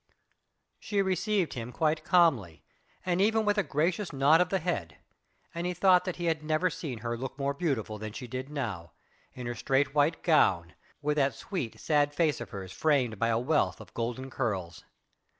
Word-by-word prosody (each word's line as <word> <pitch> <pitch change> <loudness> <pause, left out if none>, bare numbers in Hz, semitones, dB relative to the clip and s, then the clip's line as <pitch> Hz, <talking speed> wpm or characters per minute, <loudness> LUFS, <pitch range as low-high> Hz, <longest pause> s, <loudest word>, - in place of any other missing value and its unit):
She 205 -2 -2
received 190 0 0
him 120 -1 -6
quite 155 +2 0
calmly, 120 - +2 0.4
and 180 0 +1
even 220 +1 +3
with 205 0 +2
a - - +5
gracious 170 +3 -1
nod 145 +4 +4
of 180 - +1
the 195 - +1
head, 155 - -3 0.6
and 170 +1 -3
he 180 - -2
thought 180 0 +4
that 185 - -3
he 175 - -4
had 160 -2 0
never 155 +4 +1
seen 125 -9 -6
her 120 0 -1
look 130 +3 -6
more 140 0 -1
beautiful 130 -9 -2
than 110 0 -5
she 125 - -7
did 130 +2 -6
now, 110 - -5 0.4
in 125 - -7
her 120 - -2
straight 135 +4 0
white 150 +2 +2
gown, 90 - +3 0.3
with 150 +1 0
that 140 -1 +2
sweet, 175 - -5
sad 145 -1 +1
face 155 -3 +1
of - - -6
hers 95 -4 -7
framed 130 -9 +1
by 115 - +2
a 115 -1 +2
wealth 145 +6 +1
of - - -13
golden 125 +3 -4
curls. 95 -11 -3
145 Hz, 190 wpm, -29 LUFS, 120-175 Hz, 0.6 s, a